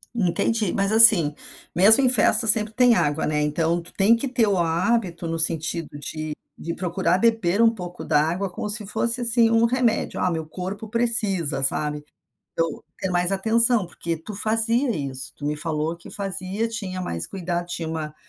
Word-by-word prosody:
Entendi, 215 Hz, +1 st, 0 dB
mas, 195 Hz, +1 st, 0 dB
assim, 215 Hz, -10 st, +7 dB, 0.4 s
mesmo 215 Hz, +9 st, +6 dB
em 255 Hz, -, +4 dB
festa 225 Hz, -1 st, +4 dB
sempre 215 Hz, 0 st, +3 dB
tem 245 Hz, -1 st, +4 dB
água, 150 Hz, -2 st, 0 dB
né, 150 Hz, -1 st, 0 dB
então 160 Hz, +3 st, 0 dB
tu 170 Hz, -, -11 dB
tem 210 Hz, +4 st, +4 dB
que 250 Hz, +4 st, -3 dB
ter 245 Hz, -3 st, +1 dB
o 200 Hz, -2 st, +1 dB
hábito, 175 Hz, +1 st, -1 dB
no 165 Hz, -, -3 dB
sentido 165 Hz, 0 st, -1 dB
de 155 Hz, +1 st, -5 dB, 0.3 s
de 170 Hz, -, -4 dB
procurar 180 Hz, 0 st, -1 dB
beber 225 Hz, -3 st, +1 dB
um 230 Hz, -, +6 dB
pouco 180 Hz, -4 st, -8 dB
d'água 160 Hz, +6 st, 0 dB
como 180 Hz, -, -6 dB
se 210 Hz, 0 st, -2 dB
fosse, 235 Hz, +4 st, -2 dB
assim, 230 Hz, -1 st, +3 dB
um 230 Hz, 0 st, +3 dB
remédio, 235 Hz, -1 st, 0 dB
"Ah 185 Hz, -, +1 dB
meu 160 Hz, -2 st, -3 dB
corpo 190 Hz, +6 st, -7 dB
precisa", 195 Hz, -, -1 dB
sabe. 150 Hz, +2 st, 0 dB, 0.5 s
Eu 165 Hz, -2 st, -2 dB, 0.2 s
ter 190 Hz, -, -3 dB
mais 175 Hz, +1 st, 0 dB
atenção, 225 Hz, +1 st, +2 dB
porque 170 Hz, -1 st, -5 dB
tu 165 Hz, +7 st, -10 dB
fazia 225 Hz, +5 st, 0 dB
isso, 135 Hz, 0 st, -6 dB
tu 145 Hz, -, -10 dB
me 150 Hz, -, -1 dB
falou 155 Hz, +1 st, -3 dB
que -, -, -13 dB
fazia, 195 Hz, +2 st, -4 dB
tinha 200 Hz, -5 st, -5 dB
mais 85 Hz, -, -4 dB
cuidado, 175 Hz, -2 st, -4 dB
tinha 170 Hz, -2 st, -4 dB
uma 155 Hz, -1 st, -5 dB
185 Hz, 180 wpm, -23 LUFS, 165-225 Hz, 0.5 s, assim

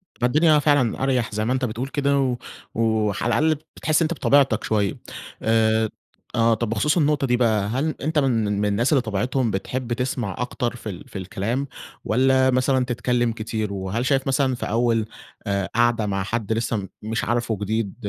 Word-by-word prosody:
بتبقى 120 Hz, -, +1 dB
الدنيا 155 Hz, +4 st, +4 dB
فعلًا 145 Hz, -5 st, +2 dB
أريَح 130 Hz, -5 st, 0 dB
زي 110 Hz, +1 st, 0 dB
ما 120 Hz, -, 0 dB
أنت 130 Hz, 0 st, 0 dB
بتقول 120 Hz, +3 st, -3 dB
كده 140 Hz, 0 st, +1 dB
و 130 Hz, -2 st, +1 dB, 0.4 s
وعلى 110 Hz, -2 st, 0 dB
الأقل 145 Hz, +7 st, +3 dB, 0.2 s
بتحسّ 155 Hz, +2 st, +1 dB
إن -, -, +3 dB
أنت -, -, 0 dB
بطبيعتك 140 Hz, -1 st, +3 dB
شوية. 105 Hz, -3 st, 0 dB, 0.4 s
آآ، 110 Hz, 0 st, +3 dB, 0.5 s
آه 115 Hz, -1 st, +4 dB
طَب 115 Hz, 0 st, -2 dB
بخصوص 115 Hz, +9 st, +1 dB
النقطة 150 Hz, -4 st, +2 dB
دي 125 Hz, -1 st, +2 dB
بقى، 110 Hz, -4 st, +2 dB
هل 140 Hz, +7 st, -1 dB
أنت 155 Hz, +2 st, 0 dB
من 110 Hz, -7 st, +1 dB
من 105 Hz, -, +1 dB
الناس 115 Hz, +7 st, +1 dB
اللي 140 Hz, -, +5 dB
طبيعتهم 120 Hz, +3 st, -1 dB
بتحب 120 Hz, +5 st, -3 dB
تسْمع 120 Hz, -5 st, -2 dB
أكتر 125 Hz, 0 st, -2 dB
في 115 Hz, -, -8 dB
ال 90 Hz, -, -9 dB
في 100 Hz, -, -7 dB
الكلام، 105 Hz, +8 st, -2 dB, 0.4 s
والّا 130 Hz, +3 st, +3 dB
مثلًا 130 Hz, 0 st, +2 dB
تتكلم 120 Hz, -1 st, 0 dB
كتير؟ 110 Hz, -2 st, -3 dB
وهل 100 Hz, +6 st, -2 dB
شايف 135 Hz, 0 st, +1 dB
مثلًا 135 Hz, -1 st, +1 dB
في 125 Hz, -, -4 dB
أول، 115 Hz, -1 st, +1 dB, 0.4 s
آآ 100 Hz, -1 st, 0 dB
قَعدة 120 Hz, -2 st, +2 dB
مع 100 Hz, -1 st, -1 dB
حد 110 Hz, +1 st, -2 dB
لسه 115 Hz, +1 st, 0 dB
م 100 Hz, -2 st, -4 dB
مش 110 Hz, +2 st, -2 dB
عارفه 120 Hz, -2 st, 0 dB
جديد، 110 Hz, -1 st, -1 dB
120 Hz, 185 wpm, -23 LUFS, 110-130 Hz, 0.5 s, اللي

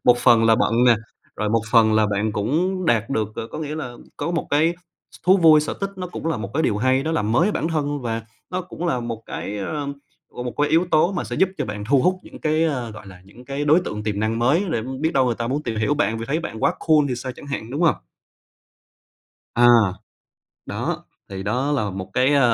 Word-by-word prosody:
một 120 Hz, 0 st, +5 dB
phần 120 Hz, -2 st, +5 dB
là 115 Hz, 0 st, +6 dB
bận 115 Hz, -, +1 dB
nè, 120 Hz, -, +7 dB, 0.4 s
rồi 105 Hz, +1 st, -1 dB
một 115 Hz, 0 st, +1 dB
phần 110 Hz, -2 st, +5 dB
là 110 Hz, 0 st, +4 dB
bạn 105 Hz, +1 st, -1 dB
cũng 170 Hz, -, 0 dB
đạt 115 Hz, 0 st, +2 dB
được, 110 Hz, -5 st, -1 dB
rồi 115 Hz, -, -5 dB
có -, -, -7 dB
nghĩa 150 Hz, -1 st, -4 dB
là 140 Hz, -6 st, -5 dB, 0.2 s
có -, -, -2 dB
một 170 Hz, -2 st, -2 dB
cái 160 Hz, +4 st, +3 dB, 0.4 s
s -, -, -15 dB
thú 185 Hz, +2 st, +7 dB
vui, 160 Hz, -4 st, +6 dB
sở 150 Hz, -, -3 dB
thích 195 Hz, 0 st, -2 dB
nó 180 Hz, -1 st, -4 dB
cũng 175 Hz, -, -7 dB
là 165 Hz, -, 0 dB
một 110 Hz, -, -5 dB
cái 160 Hz, -, +1 dB
điều 105 Hz, -, +1 dB
hay. 130 Hz, +4 st, +2 dB
Nó 160 Hz, +3 st, -2 dB
làm 110 Hz, -9 st, 0 dB
mới 175 Hz, -, +3 dB
bản 160 Hz, -, -1 dB
thân 145 Hz, -3 st, -1 dB
và 115 Hz, -1 st, -2 dB, 0.3 s
nó 185 Hz, 0 st, -1 dB
cũng 175 Hz, 0 st, -6 dB
là 130 Hz, -7 st, 0 dB
một 115 Hz, -1 st, -5 dB
cái, 105 Hz, +1 st, -5 dB
a, 145 Hz, +8 st, -3 dB, 0.6 s
một 125 Hz, -, -3 dB
cái 145 Hz, 0 st, +2 dB
yếu 165 Hz, +4 st, +3 dB
tố 170 Hz, +5 st, +3 dB
mà 180 Hz, -, -2 dB
sẽ -, -, -5 dB
giúp 190 Hz, -, +4 dB
cho -, -, 0 dB
bạn 105 Hz, -1 st, -5 dB
thu 135 Hz, +4 st, +3 dB
hút 185 Hz, -, +3 dB
những -, -, -12 dB
cái, 155 Hz, +1 st, +1 dB
à, 130 Hz, -7 st, -1 dB
gọi 110 Hz, -1 st, -11 dB
là, 95 Hz, -2 st, -12 dB
những 115 Hz, +6 st, -16 dB
cái 140 Hz, +3 st, -3 dB
đối 155 Hz, +4 st, +5 dB
tượng 105 Hz, -12 st, -5 dB
tiềm 105 Hz, -1 st, -2 dB
năng 110 Hz, +1 st, 0 dB
mới 140 Hz, +11 st, +3 dB
để 115 Hz, -, -1 dB, 0.2 s
biết 160 Hz, +2 st, +1 dB
đâu 130 Hz, -1 st, +3 dB
người 120 Hz, -, +1 dB
ta 115 Hz, +1 st, -3 dB
muốn 140 Hz, +5 st, -1 dB
tìm 115 Hz, -5 st, -3 dB
hiểu 110 Hz, +7 st, +1 dB
bạn 130 Hz, -6 st, 0 dB
vì 115 Hz, -, -5 dB
thấy 150 Hz, +6 st, -1 dB
bạn 110 Hz, -9 st, -6 dB
quá -, -, +3 dB
cool 155 Hz, -3 st, +3 dB
thì 125 Hz, -, -1 dB
sao 130 Hz, +1 st, -5 dB
chẳng -, -, -11 dB
hạn, 140 Hz, -5 st, -5 dB
đúng 140 Hz, +5 st, -3 dB
hông? 170 Hz, -, +4 dB, 1.6 s
À. 120 Hz, -, +5 dB, 1.0 s
Đó, -, -, -3 dB, 0.2 s
thì 95 Hz, -1 st, -6 dB
đó 125 Hz, +8 st, 0 dB
là 110 Hz, -8 st, 0 dB
một 95 Hz, -1 st, -6 dB
cái, 130 Hz, +3 st, +3 dB
à, 140 Hz, -, +4 dB
130 Hz, 255 wpm, -22 LUFS, 110-155 Hz, 1.6 s, nè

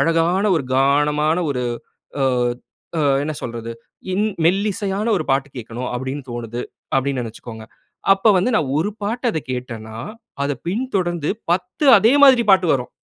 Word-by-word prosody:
அழகான, 165 Hz, +4 st, +2 dB
ஒரு 140 Hz, -, -2 dB
கானமான 150 Hz, +4 st, +2 dB
ஒரு 125 Hz, -3 st, -2 dB, 0.6 s
ஆ -, -, +3 dB, 0.8 s
ஆ -, -, +2 dB, 0.2 s
என்ன 155 Hz, +1 st, -3 dB
சொல்றது? 115 Hz, -1 st, -5 dB, 0.4 s
இன் 205 Hz, +3 st, +1 dB, 0.2 s
மெல்லிசையான 200 Hz, +3 st, 0 dB
1 160 Hz, -, -2 dB
பாட்டு 135 Hz, +1 st, +1 dB
கேட்கனும் 120 Hz, +1 st, -5 dB
அப்டின்னு 130 Hz, +3 st, -4 dB
தோணுது 120 Hz, 0 st, -5 dB, 0.3 s
அப்டின்னு 135 Hz, -1 st, 0 dB
நெனைச்சிகோங்க. 115 Hz, -1 st, -8 dB, 0.5 s
அப்ப 195 Hz, +2 st, +3 dB
வந்து 185 Hz, +7 st, +1 dB
நான் 150 Hz, -10 st, +1 dB
1 170 Hz, +7 st, +1 dB
பாட்டு 230 Hz, +5 st, -3 dB
அத 160 Hz, -, -2 dB
கேட்டேன்னா 115 Hz, -3 st, -6 dB, 0.5 s
அத 140 Hz, -, 0 dB, 0.2 s
பின் 220 Hz, +9 st, -1 dB
தொடர்ந்து 175 Hz, -5 st, -1 dB, 0.2 s
10 245 Hz, -, -1 dB
அதே 220 Hz, +6 st, +4 dB
மாரி 260 Hz, -4 st, +7 dB
பாட்டு 190 Hz, -2 st, +4 dB
வரும். 125 Hz, -3 st, -2 dB
155 Hz, 145 wpm, -20 LUFS, 125-195 Hz, 0.8 s, மாரி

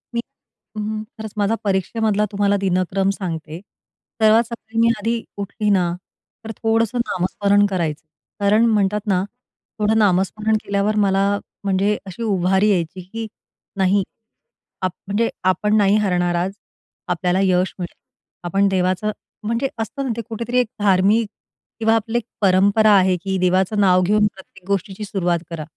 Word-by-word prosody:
मी 235 Hz, -, +1 dB, 0.6 s
अं, 215 Hz, 0 st, -3 dB
खरंच 220 Hz, -1 st, -6 dB
माझा 205 Hz, +2 st, +1 dB
परीक्षेमधला 210 Hz, +2 st, 0 dB
तुम्हाला 200 Hz, 0 st, +1 dB
दिनक्रम 190 Hz, 0 st, 0 dB
सांगते. 165 Hz, -5 st, -4 dB, 0.6 s
सर्वात 220 Hz, +1 st, +6 dB
सकाळी 225 Hz, -1 st, -6 dB
मी 230 Hz, -, +5 dB
आधी 230 Hz, +2 st, -2 dB
उठली 200 Hz, +1 st, -2 dB
ना, 180 Hz, -4 st, +2 dB, 0.5 s
तर 220 Hz, -, -4 dB
थोडंसं 225 Hz, +1 st, +1 dB
नामस्मरण 205 Hz, -1 st, +1 dB
करायचं. 165 Hz, -6 st, -2 dB, 0.3 s
कारण 210 Hz, +3 st, +4 dB
म्हणतात 210 Hz, -2 st, +2 dB
ना, 185 Hz, -2 st, +2 dB, 0.6 s
थोडं 215 Hz, +1 st, +2 dB
नामस्मरण 210 Hz, +2 st, +2 dB
केल्यावर 200 Hz, +1 st, 0 dB
मला 195 Hz, 0 st, +2 dB, 0.4 s
म्हणजे 200 Hz, +1 st, +1 dB
अशी 190 Hz, +4 st, -7 dB
उभारी 190 Hz, -1 st, +2 dB
यायची 180 Hz, 0 st, -1 dB
की 225 Hz, 0 st, -4 dB, 0.5 s
नाही 195 Hz, +1 st, +3 dB, 0.8 s
आ 185 Hz, -, +2 dB
म्हणजे 200 Hz, +5 st, -2 dB, 0.2 s
आपण 210 Hz, +4 st, 0 dB
नाही 205 Hz, -1 st, +4 dB
हरणार 180 Hz, -4 st, +1 dB
आज, 180 Hz, +3 st, -1 dB, 0.5 s
आपल्याला 180 Hz, +1 st, 0 dB
यश 185 Hz, -1 st, +2 dB
मिळेल. 175 Hz, -1 st, -6 dB, 0.5 s
आपण 195 Hz, +3 st, +2 dB
देवाचं 185 Hz, +2 st, 0 dB, 0.3 s
म्हणजे 230 Hz, +5 st, 0 dB
असतं 225 Hz, +6 st, -3 dB
ना 255 Hz, -, -1 dB
ते -, -, -1 dB
कुठेतरी 235 Hz, +2 st, -1 dB
एक 250 Hz, -, +1 dB
धार्मिक 205 Hz, +3 st, +3 dB, 0.5 s
किंवा 225 Hz, 0 st, +3 dB
आपली 225 Hz, +1 st, -1 dB
एक 240 Hz, -, -3 dB, 0.2 s
परंपरा 200 Hz, +3 st, +4 dB
आहे, 185 Hz, -1 st, +3 dB
की 190 Hz, +2 st, -3 dB
देवाचं 185 Hz, +3 st, +1 dB
नाव 185 Hz, -2 st, +5 dB
घेऊन 210 Hz, +3 st, +3 dB
प्रत्येक 190 Hz, -1 st, -17 dB
गोष्टीची 200 Hz, +1 st, -2 dB
सुरुवात 180 Hz, -4 st, 0 dB
करा. 165 Hz, -2 st, -5 dB
200 Hz, 145 wpm, -20 LUFS, 185-215 Hz, 0.8 s, सर्वात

